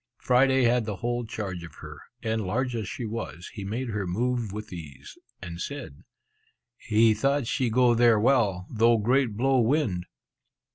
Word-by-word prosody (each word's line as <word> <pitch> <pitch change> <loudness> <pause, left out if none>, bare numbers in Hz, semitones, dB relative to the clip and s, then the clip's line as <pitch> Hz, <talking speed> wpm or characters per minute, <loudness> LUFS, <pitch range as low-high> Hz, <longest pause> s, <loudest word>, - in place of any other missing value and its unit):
Friday 130 +1 +3
had 120 -1 +3
the 105 -2 -3
whole 120 +3 -2
charge 95 -6 -5
of 85 - -11
her; - - -10 0.2
and, 110 0 -1
large 120 +6 -1
as 110 -4 -3
she 120 - -5
was, 110 -5 -6
he 100 - -6
made 115 +6 -3
her 100 -3 -3
move 120 +3 -1
with 105 -1 -7
ease, 75 -6 -10 0.3
and 85 0 -7
said, 135 - -7 0.7
"he 110 -1 +3
thought 135 +5 +1
she 125 +1 0
go 120 +1 +4
there 115 -2 +4
well, 105 -7 +2
though 115 0 +4
great 120 0 +1
blow 135 +2 +3
wind!" 115 - +1
115 Hz, 165 wpm, -26 LUFS, 100-125 Hz, 0.7 s, go